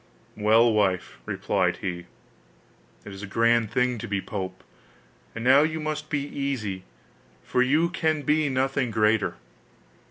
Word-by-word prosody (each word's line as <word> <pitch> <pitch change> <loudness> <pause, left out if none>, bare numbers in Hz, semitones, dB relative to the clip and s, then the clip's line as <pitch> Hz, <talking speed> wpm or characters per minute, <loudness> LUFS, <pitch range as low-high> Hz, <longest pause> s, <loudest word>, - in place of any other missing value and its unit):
'Well, 110 +2 +4
wife,' 95 -4 0
replied - - 0
he, 90 -2 -5 1.0
'it 100 - -8
is 95 - -9
a 100 - -6
grand 115 +1 +2
thing 125 0 0
to - - -6
be 100 -1 -1
pope; 95 -2 -6 0.7
and 115 - -5
now 135 +3 +6
you 155 +1 0
must 155 0 -4
be 145 -2 -1
easy, 125 -10 -4 0.6
for 125 - 0
you 150 +6 +3
can 160 -4 -1
be 150 +1 +2
nothing 135 0 0
greater. 105 0 +1
120 Hz, 145 wpm, -25 LUFS, 105-145 Hz, 1.0 s, now